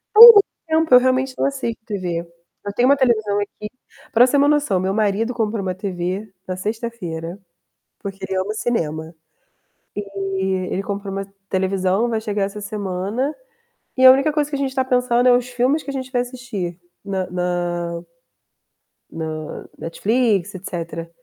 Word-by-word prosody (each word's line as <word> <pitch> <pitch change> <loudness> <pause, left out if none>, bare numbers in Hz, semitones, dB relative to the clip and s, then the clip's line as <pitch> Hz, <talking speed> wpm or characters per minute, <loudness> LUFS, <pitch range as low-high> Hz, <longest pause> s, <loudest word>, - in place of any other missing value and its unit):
Há - - +6
muito 460 -3 +12 0.3
tempo, 320 -3 +2
eu 250 - +10
realmente 260 +1 +1
não - - +1
assisto 265 -4 -2
TV. 180 -6 -3 0.4
Eu 200 - -4
tenho 245 +4 +3
uma 280 - +5
televisão 215 -6 +2
aqui 210 +1 -5 0.4
para 235 +2 +6
você 255 - -1
ter 285 - +5
uma 285 - +4
noção, 290 -10 +2
meu 190 +1 -1
marido 215 +3 0
comprou 220 -2 -1
uma 185 -1 -2
TV 190 +2 -4 0.2
na 185 - -3
sexta-feira, 190 -5 -5 0.6
porque 195 -2 -6
ele 190 0 -2
ama 190 +3 -1
cinema. 160 -9 -2 0.9
E 195 -1 -3 0.3
ele 195 - -1
comprou 200 0 -4
uma 195 0 -4 0.2
televisão, 190 +3 +1
vai 225 -2 -1
chegar 210 -2 -1
essa 205 +1 -5
semana, 205 +6 -3 0.6
e 260 - +3
a 260 - +12
única 275 +3 +2
coisa 295 -1 0
que 290 - -2
a - - -4
gente 270 -1 -2
tá 260 -1 +1
pensando 250 -1 +2
é 245 - +7
os 245 0 -2
filmes 250 +5 +1
que - - -6
a - - -4
gente 260 -1 -5
vai 245 -2 +2
assistir 240 -9 -6 0.3
na 190 -2 -2
na 175 -1 -2 1.1
na 155 -1 -6
Netflix, 205 +1 0
etc. 170 -2 -6
205 Hz, 170 wpm, -21 LUFS, 185-250 Hz, 1.1 s, muito